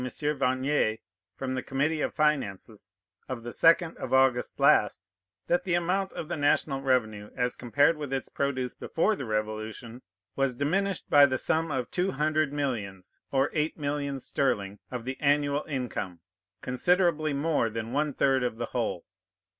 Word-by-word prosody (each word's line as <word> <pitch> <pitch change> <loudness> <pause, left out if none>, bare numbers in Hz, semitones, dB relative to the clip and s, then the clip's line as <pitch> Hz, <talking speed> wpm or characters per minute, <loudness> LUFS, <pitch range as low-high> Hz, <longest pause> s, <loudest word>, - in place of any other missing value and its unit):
Vernier, 130 -3 0 0.4
from 130 -1 -3
the 130 - -2
Committee 145 +5 -1
of - - 0
Finances, 115 - -1 0.4
of 125 -3 -5
the 120 - -6
second 165 +3 +3
of - - -5
August 130 -2 +2
last, - - +4 0.4
that 175 - +2
the 180 -3 0
amount 185 +3 0
of 160 - -5
the - - -3
national 145 -2 +1
revenue, 110 -6 0
as 125 -1 0
compared 145 +6 +2
with 145 -3 -5
its 135 -1 -2
produce 130 -3 -2
before 210 +6 0
the 135 - -6
Revolution, 110 +2 -4 0.3
was 135 -2 0
diminished 185 +8 -1
by 145 -1 +8
the 130 -1 -1
sum 160 +5 0
of 130 -4 -3
two 185 +2 0
hundred 155 +1 +1
millions, 110 -10 -4
or 135 +1 +2
eight 155 +1 -1
millions 140 -2 -3
sterling, 100 -7 -1
of 125 -2 -5
the 130 0 -4
annual 145 0 +2
income, 120 - -4 0.4
considerably 155 +3 +2
more 145 -4 +1
than 115 +2 -5
one 150 +1 +1
third 135 -1 +2
of 120 -2 -2
the 120 - -2
whole. 115 -8 -2
135 Hz, 160 wpm, -28 LUFS, 120-150 Hz, 0.4 s, by